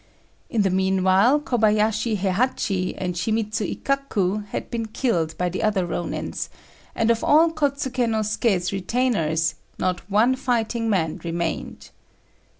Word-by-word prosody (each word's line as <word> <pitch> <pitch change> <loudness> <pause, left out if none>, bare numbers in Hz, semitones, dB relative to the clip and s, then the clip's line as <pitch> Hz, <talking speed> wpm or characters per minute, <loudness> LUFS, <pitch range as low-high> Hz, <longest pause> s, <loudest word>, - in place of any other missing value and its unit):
In 220 -4 +1
the 195 - +1
meanwhile 190 +7 +3
Kobayashi 215 -4 +1
Héhachi 195 -1 0
and 180 -1 -2
Shimidzu 215 +3 -1
Ikkaku 210 -8 0
had - - -5
been 230 -2 -2
killed 180 - -1
by 180 - 0
the 180 +2 -3
other 205 -4 +1
Rônins, 175 0 -4 0.5
and 225 +1 +2
of 230 - 0
all 320 +2 +5
Kôtsuké 275 -5 0
no 220 -1 +1
Suké's 205 -4 0
retainers 180 -7 0 0.2
not 185 -1 -1
one 225 +6 +3
fighting 235 -2 -1
man 170 -4 0
remained. 170 -1 -4
210 Hz, 130 wpm, -23 LUFS, 185-235 Hz, 0.5 s, all